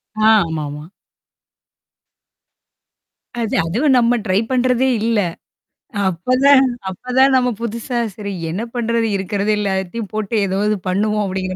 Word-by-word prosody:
அ, 215 Hz, -, +1 dB, 0.2 s
ஆமாமா. 150 Hz, -1 st, -5 dB, 2.5 s
அது, 225 Hz, -, -1 dB
அதுவும் 255 Hz, -, +2 dB
நம்ம 240 Hz, 0 st, +3 dB
ட்ரை 185 Hz, +2 st, +2 dB
பண்றதே 255 Hz, 0 st, +2 dB, 0.2 s
இல்ல, 230 Hz, -1 st, +1 dB, 0.9 s
அப்பதான் 255 Hz, +10 st, +4 dB, 0.3 s
அப்பதான் 255 Hz, +7 st, +2 dB
நம்ம 250 Hz, -1 st, +3 dB
புதுசா 235 Hz, +2 st, -3 dB, 0.2 s
சரி 200 Hz, -2 st, -5 dB, 0.2 s
என்ன 190 Hz, -, -3 dB
பண்றது, 230 Hz, -1 st, 0 dB
இருக்கிறது 200 Hz, +2 st, -1 dB
எல்லாத்தையும் 200 Hz, +1 st, -3 dB
போட்டு 215 Hz, +1 st, -2 dB
ஏதாவது 205 Hz, +3 st, 0 dB
பண்ணுவோம் 210 Hz, +3 st, 0 dB
அப்படிங்கிற 185 Hz, -1 st, -3 dB
215 Hz, 110 wpm, -18 LUFS, 190-245 Hz, 2.5 s, அப்பதான்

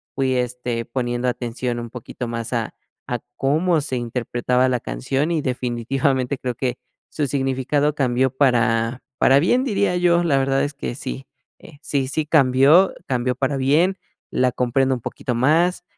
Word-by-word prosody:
fui, 130 Hz, -1 st, +1 dB
este, 125 Hz, -1 st, -2 dB
poniendo 120 Hz, 0 st, -2 dB
atención 120 Hz, 0 st, -3 dB
un 120 Hz, 0 st, -6 dB
poquito 125 Hz, 0 st, -7 dB
más 115 Hz, +1 st, -4 dB
a 115 Hz, -2 st, -2 dB, 0.3 s
a 125 Hz, -, -2 dB, 0.2 s
cómo 155 Hz, +4 st, +1 dB
se 140 Hz, -3 st, -3 dB
interpretaba 120 Hz, +1 st, 0 dB
la 125 Hz, -1 st, 0 dB
canción 135 Hz, -, -2 dB
y 160 Hz, -, 0 dB
definitivamente, 130 Hz, +1 st, -1 dB
creo 125 Hz, -1 st, -3 dB
que 125 Hz, -1 st, -2 dB, 0.3 s
su 150 Hz, -2 st, -2 dB
significado 135 Hz, +2 st, 0 dB
cambió 130 Hz, -2 st, +1 dB
para 120 Hz, -2 st, +1 dB, 0.2 s
para 135 Hz, +1 st, +5 dB
bien, 245 Hz, -, +2 dB
diría 200 Hz, -6 st, +1 dB
yo. 175 Hz, -1 st, +3 dB
La 145 Hz, -5 st, +2 dB
verdad 135 Hz, 0 st, +1 dB
es 145 Hz, -, -2 dB
que 140 Hz, -3 st, -5 dB
sí, 135 Hz, -1 st, -6 dB, 0.3 s
eh, 145 Hz, -, -15 dB
sí 140 Hz, -4 st, -1 dB
sí 155 Hz, +3 st, -1 dB
cambió, 150 Hz, +4 st, +5 dB
cambió 125 Hz, -1 st, 0 dB
para 135 Hz, +2 st, -1 dB
bien, 155 Hz, +9 st, +2 dB, 0.3 s
la 125 Hz, 0 st, +2 dB
comprendo 130 Hz, +2 st, +1 dB
un 120 Hz, -, -8 dB
poquito 125 Hz, +2 st, -4 dB
más, 165 Hz, +9 st, +2 dB
130 Hz, 160 wpm, -21 LUFS, 125-145 Hz, 0.3 s, para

